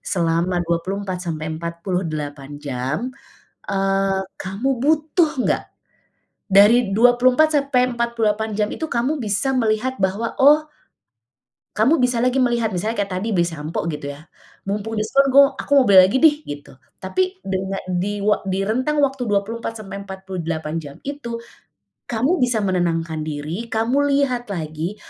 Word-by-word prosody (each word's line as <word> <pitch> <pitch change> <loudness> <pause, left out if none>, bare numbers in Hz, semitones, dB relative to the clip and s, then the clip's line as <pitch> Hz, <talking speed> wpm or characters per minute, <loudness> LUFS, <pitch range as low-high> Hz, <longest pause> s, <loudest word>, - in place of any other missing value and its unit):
selama 175 0 0
24 185 +3 -2
sampai 155 -1 -3
48 160 -5 -4
jam, 145 - -3 0.6
eee, 195 0 +1 0.2
kamu 195 +8 -3 0.2
butuh 310 +2 +2
nggak? - - 0 0.8
Dari 205 +2 +5
24 250 +6 +4
sampai 255 -3 +1
48 220 -2 0
jam 210 -1 +1
itu - - -4
kamu 255 +5 0
bisa 215 +4 -1
melihat 230 +2 0
bahwa 195 +4 0
oh, 300 +3 +5 1.1
kamu 250 +10 +3
bisa 250 -1 +1
lagi 255 +1 +2
melihat 240 -3 +1
misalnya 210 +5 -2
kayak 200 - -4
tadi 220 +3 -3
beli 175 - +3
sampo 160 -1 -4
gitu 150 -1 -6
ya, 145 +2 -12 0.4
"Mumpung 210 +2 -3
diskon 275 +6 +2
gua 275 0 +6
aku - - -7
mau 260 - +3
beli 195 -2 +8
lagi 205 - +1
deh." 310 -2 +7
gitu 145 -2 -8 0.3
tapi 370 - -1
dengan 190 0 -3
di 195 +4 -1
wa 210 +1 +2
di 190 +1 0
rentang 260 +7 0
waktu 270 -2 0
24 220 +3 -2
sampai 195 0 -7
48 175 -5 -5
jam 145 -3 -10
itu, 240 -5 -5 0.7
kamu 250 +10 +1
bisa 240 -3 0
menenangkan 165 -4 -1
diri 155 +9 -4
kamu 240 +6 +1
lihat 255 -4 0
lagi 160 +3 -4
205 Hz, 140 wpm, -21 LUFS, 175-250 Hz, 1.1 s, beli